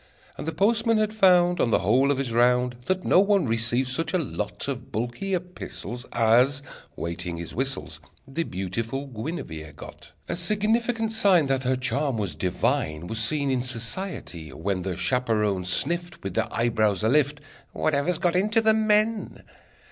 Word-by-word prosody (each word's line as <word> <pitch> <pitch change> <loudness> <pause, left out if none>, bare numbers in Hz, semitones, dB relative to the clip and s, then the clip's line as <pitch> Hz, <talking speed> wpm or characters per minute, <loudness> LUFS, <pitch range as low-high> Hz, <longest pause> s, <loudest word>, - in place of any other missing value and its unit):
And - - -7
the - - 0
postman 225 +6 +2
had 215 0 +1
found, 180 -4 +4
On - - +2
the - - +4
whole 130 +7 +3
of 145 - +2
his 135 -3 -2
round, 125 +1 +3
That 185 -1 0
no - - +5
one 200 -2 +3
received 115 +2 +1
such 160 +7 -2
a - - +5
lot 135 - -4
Of - - -5
bulky 120 - -2
epistles 175 -8 -7
As, 125 +5 +3 0.3
waiting 85 +1 -4
his 85 0 -7
whistles, 135 +2 -3 0.3
The 135 +5 -3
beautiful 115 - -3
Guinevere 110 - -6
got! - - -12 0.2
A - - -2
significant 220 +5 0
sign 195 -7 +4
That 135 -1 0
her 130 +1 +2
charm 135 0 -1
was 100 -6 -2
divine 80 -1 -1
Was 110 +5 -3
seen 140 +5 0
in 130 -1 +1
society, 120 - -4
when 95 +2 -2
The 95 0 -4
chaperons 105 -3 0
sniffed 175 - -1
With 95 -2 -4
their - - -1
eyebrows 110 -4 +1
alift: 145 +5 +3 0.3
"Whatever's 155 +3 0
got 175 0 +1
into 210 +5 +3
the 220 -1 +4
men?" 215 0 +1
135 Hz, 165 wpm, -25 LUFS, 110-180 Hz, 0.3 s, no